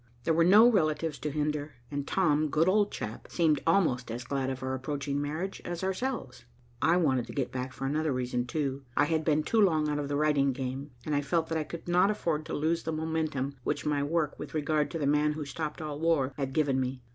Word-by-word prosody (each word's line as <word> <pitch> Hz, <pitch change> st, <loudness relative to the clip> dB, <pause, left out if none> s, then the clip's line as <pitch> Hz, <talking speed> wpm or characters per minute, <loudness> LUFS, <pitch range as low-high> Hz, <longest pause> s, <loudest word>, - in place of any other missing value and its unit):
There 165 Hz, -, +2 dB
were 165 Hz, +1 st, +4 dB
no 205 Hz, +7 st, +8 dB
relatives 160 Hz, -8 st, +1 dB
to 150 Hz, -, -2 dB
hinder, 150 Hz, -1 st, -2 dB, 0.2 s
and 145 Hz, -1 st, -3 dB
Tom, 155 Hz, -5 st, +2 dB
good 160 Hz, +4 st, +2 dB
old 205 Hz, +2 st, +3 dB
chap, 110 Hz, +1 st, -6 dB
seemed 155 Hz, -5 st, +2 dB
almost 160 Hz, -9 st, +2 dB
as 120 Hz, +2 st, -4 dB
glad 135 Hz, +1 st, -2 dB
of 130 Hz, -1 st, -5 dB
our 130 Hz, 0 st, -2 dB
approaching 140 Hz, +1 st, -2 dB
marriage 160 Hz, +7 st, -3 dB
as 175 Hz, +1 st, -5 dB
ourselves. 190 Hz, -, -3 dB, 0.4 s
I 165 Hz, +5 st, +4 dB
wanted 130 Hz, -8 st, +1 dB
to -, -, -8 dB
get 135 Hz, -3 st, -2 dB
back 130 Hz, 0 st, -4 dB
for 135 Hz, -, -6 dB
another 155 Hz, +2 st, 0 dB
reason, 125 Hz, -1 st, -1 dB
too. 140 Hz, -1 st, -2 dB, 0.2 s
I 145 Hz, -, +5 dB
had 160 Hz, +1 st, 0 dB
been 155 Hz, -1 st, +2 dB
too 225 Hz, +6 st, +2 dB
long 160 Hz, -6 st, +3 dB
out 150 Hz, 0 st, -1 dB
of 145 Hz, -, -2 dB
the 145 Hz, -, -2 dB
writing 145 Hz, -2 st, +2 dB
game, 135 Hz, +2 st, -4 dB, 0.2 s
and 155 Hz, -, -1 dB
I 145 Hz, -, +2 dB
felt 160 Hz, +3 st, 0 dB
that 165 Hz, -, 0 dB
I -, -, -1 dB
could 170 Hz, +2 st, -8 dB
not 180 Hz, +3 st, +4 dB
afford 165 Hz, -7 st, -1 dB
to -, -, -3 dB
lose 165 Hz, +3 st, 0 dB
the 160 Hz, -, -3 dB
momentum 155 Hz, -4 st, -2 dB
which -, -, -2 dB
my 150 Hz, -1 st, +1 dB
work 150 Hz, +1 st, -1 dB
with 150 Hz, -, -7 dB
regard 150 Hz, 0 st, +1 dB
to 165 Hz, -, -4 dB
the 150 Hz, -, -1 dB
man 150 Hz, +1 st, +3 dB
who 150 Hz, -1 st, -5 dB
stopped 150 Hz, +3 st, -4 dB
all 150 Hz, -1 st, -5 dB
war 155 Hz, -5 st, +2 dB
had 135 Hz, -2 st, -3 dB
given 140 Hz, -3 st, +2 dB
me. 130 Hz, -1 st, -3 dB
150 Hz, 235 wpm, -29 LUFS, 140-160 Hz, 0.4 s, no